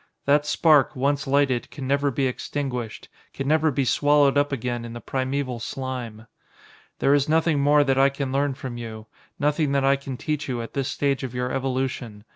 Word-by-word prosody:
That 145 +1 +3
spark, 150 -2 +4
once 140 +2 0
lighted, 135 -3 +1
can 140 -2 -7
never 140 +1 +1
be 135 +1 -1
extinguished, 125 -2 -4 0.3
can 135 - -3
never 155 +1 +3
be 140 -1 0
swallowed 145 +2 +3
up 145 0 +2
again 120 -2 -3
in 115 0 -7
the 120 - -6
primeval 130 -1 -2
slime. 120 -3 -5 0.7
"There 140 - +3
is 145 0 +2
nothing 160 -1 +2
more 145 +1 +4
that 135 -1 +1
I 135 +1 +6
can 140 -1 -4
learn 140 0 0
from 130 -3 -6
you 110 -2 -7 0.3
nothing 150 0 +1
that 140 -1 +2
I 140 0 +4
can 135 -2 -7
teach 150 0 -3
you 125 -2 -2
at 115 - -9
this 135 -2 -1
stage 140 0 0
of 130 -2 -5
your 125 0 -2
evolution. 130 -5 -3
135 Hz, 195 wpm, -24 LUFS, 125-145 Hz, 0.7 s, I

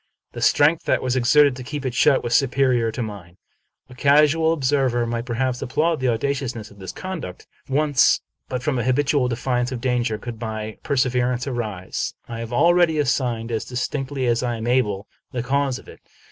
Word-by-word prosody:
The - - -7
strength 155 +3 +3
that - - +1
was 130 0 0
exerted 135 +2 +4
to 130 - -7
keep 140 +1 -5
it 130 - -2
shut 135 +3 +3
was 120 - -2
superior 130 -3 +2
to 120 +2 -3
mine. 95 -5 -9 0.5
A 130 - -14
casual 150 +4 +4
observer 135 -5 +1
might, 115 +1 -3
perhaps, 125 +1 -1
applaud 160 +5 0
the 130 - 0
audacious 130 +2 -1
ness 110 -1 -8
of 100 - -17
this 95 - -6
conduct. 170 - -7 0.2
Whence, 145 0 +3 0.3
but 125 -1 -3
from 135 -3 0
a - - -1
habitual 135 +1 +2
defiance 125 +1 -1
of 130 - -4
danger, 120 -3 0
could 115 0 -8
rny 110 -1 -5
perseverance 125 -2 0
arise? 110 -8 -4
I 115 -1 -6
have 115 0 -6
already 170 +4 +4
assigned, 125 -5 0
as 110 -2 -1
distinctly 130 +1 -3
as 120 -1 +2
I 120 -1 -1
am 110 - -5
able, 110 -5 +1 0.3
the 120 -2 -2
cause 135 0 0
of - - -14
it. - - -13
125 Hz, 190 wpm, -22 LUFS, 120-140 Hz, 0.5 s, exerted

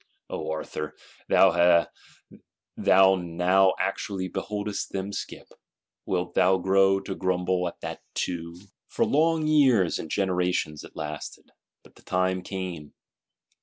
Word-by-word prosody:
O - - -4
Arthur, 75 -1 -5 0.3
thou 85 -2 +5 1.3
now 90 +2 +2
actually 95 -2 -2
beholdest 105 +2 -4
them 100 +1 -4
skip;—wilt 90 -2 -7
thou 95 +1 +4
grow 95 +1 +3
to 95 - -5
grumble 90 -1 0
at 85 - -9
that - - -6
too? 85 -1 -3 0.3
For - - 0
long 160 +1 +2
years 130 - +3
and 80 - -7
generations 90 -5 -1
it - - -14
lasted, 75 0 -7 0.3
but - - -21
the - - -18
time 95 0 0
came. 90 -5 -6
90 Hz, 115 wpm, -26 LUFS, 85-95 Hz, 1.3 s, thou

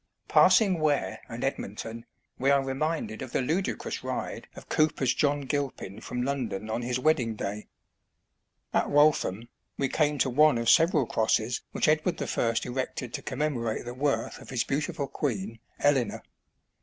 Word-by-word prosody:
Passing 195 -6 +5
Ware 140 -10 0
and 115 0 -6
Edmonton, 115 -2 -4 0.3
we 135 - +2
are 140 -1 +4
reminded 135 -3 -2
of 125 - -7
the - - +2
ludicrous 175 +9 -2
ride - - -4
of - - -11
Cowper's 150 -5 +2
John 145 +3 +1
Gilpin 135 -7 -3
from 125 0 -3
London 120 -6 -3
on 115 - -1
his 120 +1 -1
wedding 125 -5 +1
day. 105 +1 -5 1.1
At - - +2
Waltham, 145 -8 +3 0.3
we 135 - 0
came 150 0 +1
to 130 - +2
one 150 0 +5
of 115 0 +3
several 160 -4 +4
crosses 110 +2 +1
which - - 0
Edward 155 +3 +2
I. 115 - 0
erected 125 -1 -4
to - - -3
commemorate 130 -6 -2
the 120 - -5
worth 140 +2 -1
of - - -12
his 125 -4 0
beautiful 140 0 -2
queen, 115 -6 -3 0.2
Eleanor. 135 -6 +1
130 Hz, 155 wpm, -28 LUFS, 115-145 Hz, 1.1 s, Passing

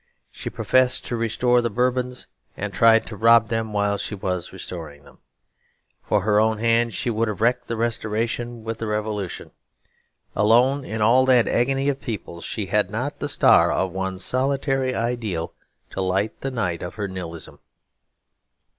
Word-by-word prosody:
She - - -6
professed 130 0 +1
to 120 - -3
restore 120 +2 +2
the 120 - -1
Bourbons, 125 +2 -1 0.3
and 105 0 -4
tried 115 +1 +5
to 110 - -8
rob 115 +1 +5
them 115 -2 -2
while 100 -1 0
she 105 - -4
was 90 -3 -3
restoring 75 -5 -8
them. - - -19 0.8
For - - 0
her 105 +1 +2
own 110 0 +2
hand 115 0 +2
she 120 - -1
would 115 +1 0
have 105 -3 -4
wrecked 120 +3 +1
the 115 - -3
Restoration 115 +1 -2
with 115 0 -5
the 115 - -3
Revolution. 105 -3 -3 0.8
Alone 120 +7 +3
in 110 -3 -3
all 125 +4 +5
that 125 -3 +5
agony 135 +3 +1
of 140 -1 -1
peoples, 100 -7 -6
she 105 - -3
had 105 0 +1
not 120 +8 -4
the 145 - -2
star - - +5
of 95 -1 0
one 95 +1 -3
solitary 135 +3 0
ideal 115 -8 -2 0.4
to 95 - -3
light 95 +3 -1
the 135 - -2
night 90 -10 -2
of 90 - -6
her 105 -2 -3
nihilism. 90 -3 -7
115 Hz, 165 wpm, -23 LUFS, 100-120 Hz, 0.8 s, tried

